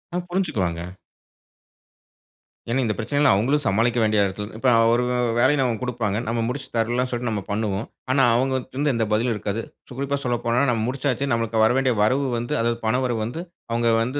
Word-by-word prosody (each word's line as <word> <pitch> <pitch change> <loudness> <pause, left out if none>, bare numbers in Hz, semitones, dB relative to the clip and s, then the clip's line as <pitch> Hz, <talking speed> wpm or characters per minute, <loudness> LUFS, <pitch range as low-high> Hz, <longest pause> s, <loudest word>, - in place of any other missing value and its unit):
ஆ. - - +1
புரிஞ்சுக்குவாங்க. 100 - -1 1.8
ஏன்னா, 120 +3 0
இந்த 110 - 0
பிரச்சனைகளை 145 +5 +2
அவுங்களும் 135 +9 +1
சமாளிக்க 115 +4 +2
வேண்டிய 105 -1 +3
எடத்தில 105 +2 -5
இப்ப 130 +3 +2 0.2
அவரு 120 +2 +3 0.4
வேலைய 130 +5 +4
நமக்கு 120 -4 -1
கொடுப்பாங்க. 115 -5 -1
நம்ம 115 +1 -1
முடிச்சு 130 +3 -4
தர்லாம் 120 +3 +1
சொல்லிட்டு 120 -1 -2
நாம 105 -3 -3
பண்ணுவோம். 105 0 -1 0.3
ஆனா 135 +1 +4
அவுங்கட்டிருந்து 130 +3 0
எந்த 115 -1 0
பதிலும் 115 +3 +1
இருக்காது. 105 +1 -3 0.3
ஸோ - - -18
குறிப்பா 140 +1 -1
சொல்லப்போனா 120 -1 0
நாம 115 -2 -1
முடிச்சாச்சு. 135 0 -1
நமக்கு 115 -1 0
வர 110 - +5
வேண்டிய 130 -2 +2
வரவு 130 +6 +2
வந்து 120 +1 -3
அதாவது 115 0 0
பண 110 - +2
வரவு 120 -3 -1
வந்து 125 +9 -5 0.3
அவங்க 115 0 +1
வந்து 130 +5 -2
120 Hz, 175 wpm, -23 LUFS, 110-130 Hz, 1.8 s, வர